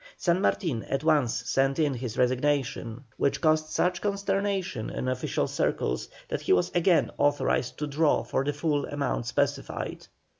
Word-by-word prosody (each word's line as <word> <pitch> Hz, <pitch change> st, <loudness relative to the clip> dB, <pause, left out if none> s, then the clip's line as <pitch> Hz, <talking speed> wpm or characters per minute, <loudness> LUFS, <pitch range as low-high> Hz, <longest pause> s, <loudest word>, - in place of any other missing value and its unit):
San 175 Hz, +1 st, +1 dB
Martin 160 Hz, -, 0 dB
at 135 Hz, -, -2 dB
once 145 Hz, -7 st, +2 dB
sent 135 Hz, 0 st, +2 dB
in 150 Hz, -3 st, +2 dB
his 120 Hz, -3 st, -5 dB
resignation, 130 Hz, -2 st, 0 dB
which 140 Hz, -1 st, +1 dB
caused 155 Hz, 0 st, +2 dB
such 180 Hz, +3 st, 0 dB
consternation 200 Hz, -, -1 dB
in 130 Hz, -, -4 dB
official 130 Hz, 0 st, -1 dB
circles 60 Hz, -, -1 dB, 0.2 s
that -, -, -3 dB
he -, -, +2 dB
was 90 Hz, -1 st, +2 dB
again 175 Hz, 0 st, +3 dB
authorized 145 Hz, -3 st, +1 dB
to 150 Hz, -, -2 dB
draw 150 Hz, +1 st, +2 dB
for -, -, -1 dB
the 145 Hz, -, 0 dB
full 145 Hz, 0 st, -1 dB
amount 140 Hz, -4 st, -2 dB
specified. -, -, -2 dB
145 Hz, 155 wpm, -27 LUFS, 130-165 Hz, 0.2 s, again